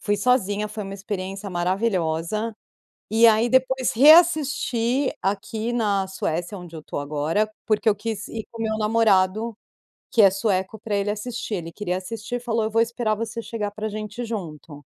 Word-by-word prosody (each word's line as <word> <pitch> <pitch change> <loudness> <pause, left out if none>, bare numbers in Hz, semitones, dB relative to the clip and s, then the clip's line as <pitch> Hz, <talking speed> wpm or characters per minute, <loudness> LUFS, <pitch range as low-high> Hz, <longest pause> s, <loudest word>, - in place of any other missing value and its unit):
Fui 205 0 0
sozinha. 210 -4 +1
Foi 215 0 -6
uma 195 -1 -7
experiência 195 0 -5
maravilhosa, 185 +2 -1 0.6
e 230 +1 +6
aí 225 +1 +4
depois 260 -1 +2
reassisti 285 -4 +4
aqui 215 +4 -2
na 205 -5 +1
Suécia, 175 0 -3
onde 175 -2 -10
eu 160 - -7
tô - - -6
agora, 155 +9 0 0.2
porque 215 0 0
eu - - +4
quis 210 -1 -4
ir 220 -2 -6
com 230 - -11
o - - 0
meu 220 -1 -1
namorado, 215 0 +2 0.6
que 225 - +4
é 195 - +8
sueco, 195 0 -1
pra 215 -1 -3
ele 200 +1 0
assistir. 220 0 -4
Ele 165 -2 -6
queria 180 -1 -2
assistir 225 +5 -5
e - - -5
falou: 230 -2 -1
"Eu 220 - -1
vou 225 +1 +2
esperar 230 -1 -1
você 230 +1 -4
chegar 215 -3 -4
pra 215 +1 -4
gente 215 +2 -6
ir - - -3
junto". 160 -9 -7
215 Hz, 180 wpm, -23 LUFS, 190-230 Hz, 0.6 s, é